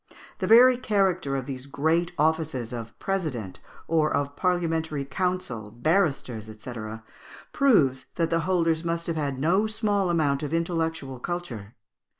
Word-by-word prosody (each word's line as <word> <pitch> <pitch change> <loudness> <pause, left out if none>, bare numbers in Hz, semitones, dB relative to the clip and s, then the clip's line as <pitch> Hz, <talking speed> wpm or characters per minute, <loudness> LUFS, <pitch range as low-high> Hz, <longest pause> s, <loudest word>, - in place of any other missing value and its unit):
The - - -1
very 245 +3 +8
character 190 - +1
of 135 -2 -2
these 130 0 -6
great 160 +5 +1
offices 155 -6 0
of 115 -2 -7
president, 150 - -3 0.3
or 155 -2 +2
of 140 0 -1
parliamentary 165 -5 0
counsel, 160 - -2
barristers, 130 - 0
&c., 110 +3 -9 0.8
proves 155 - +3
that 165 -2 0
the 165 - +3
holders 165 -2 +1
must 170 0 -2
have 165 - -2
had 140 -4 -2
no 180 +10 +2
small 210 -3 0
amount 145 -5 +1
of 155 +2 -2
intellectual 160 -6 -2
culture. 125 - -5
160 Hz, 140 wpm, -26 LUFS, 135-180 Hz, 0.8 s, very